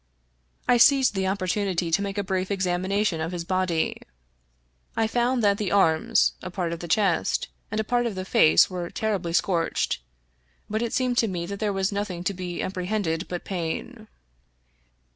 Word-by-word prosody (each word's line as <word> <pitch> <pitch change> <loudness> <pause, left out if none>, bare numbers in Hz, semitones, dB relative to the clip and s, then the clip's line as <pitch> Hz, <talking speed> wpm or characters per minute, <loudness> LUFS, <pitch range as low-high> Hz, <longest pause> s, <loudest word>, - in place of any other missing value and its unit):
I 245 - +5
seized 265 -1 +5
the 190 -1 -1
opportunity 185 -2 -1
to 180 - +3
make 200 0 -4
a 205 - 0
brief 190 -1 -2
examination 190 -1 0
of 165 +2 -2
his 175 -2 -4
body. 185 -3 0 1.0
I 225 - +3
found 240 +2 +1
that 200 -1 +3
the 205 -3 -1
arms, 160 -6 +3
a 185 - -6
part 175 -2 -2
of 170 - -6
the 170 - -6
chest, 190 -1 +1 0.2
and 215 - -2
a - - +1
part 240 +2 +1
of 215 - -4
the 185 0 -4
face 80 - +5
were 175 -2 -5
terribly 200 -6 -2
scorched; 170 0 0 0.7
but 220 +1 -2
it 235 -1 -1
seemed 250 -1 +1
to 225 - +3
me 175 -4 -3
that 200 +2 -6
there 210 -2 0
was 195 0 0
nothing 200 -4 -3
to 200 - 0
be 180 -1 -4
apprehended 180 -2 -2
but 175 -1 -5
pain. 200 +6 -4
190 Hz, 180 wpm, -25 LUFS, 175-210 Hz, 1.0 s, I